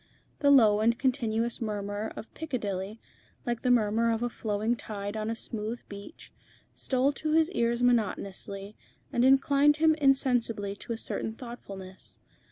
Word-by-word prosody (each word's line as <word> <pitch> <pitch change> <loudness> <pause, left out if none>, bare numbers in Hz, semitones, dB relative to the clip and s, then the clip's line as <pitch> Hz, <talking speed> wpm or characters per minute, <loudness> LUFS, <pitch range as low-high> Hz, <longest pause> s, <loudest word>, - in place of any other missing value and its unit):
The 285 - +3
low 220 -7 +6
and 230 +2 +3
continuous 235 -4 0
murmur 205 -1 -3
of 220 - -9
Piccadilly, 215 -8 -4 0.5
like 240 -2 -2
the 250 - 0
murmur 230 -1 +3
of 225 +1 -1
a 240 - -1
flowing 215 +2 -1
tide 205 -2 -6
on 215 0 -2
a 230 - -1
smooth 225 +1 -4
beach, 200 +9 -10 0.4
stole 265 +1 +1
to 305 +2 -2
his 320 +2 +3
ears 235 -5 0
monotonously, 200 -3 -1 0.4
and 240 - +2
inclined 280 +2 +5
him 315 0 +5
insensibly 245 -8 +1
to 235 - -5
a - - -5
certain 220 0 -4
thoughtfulness. 195 -6 -9
230 Hz, 150 wpm, -29 LUFS, 210-255 Hz, 0.5 s, low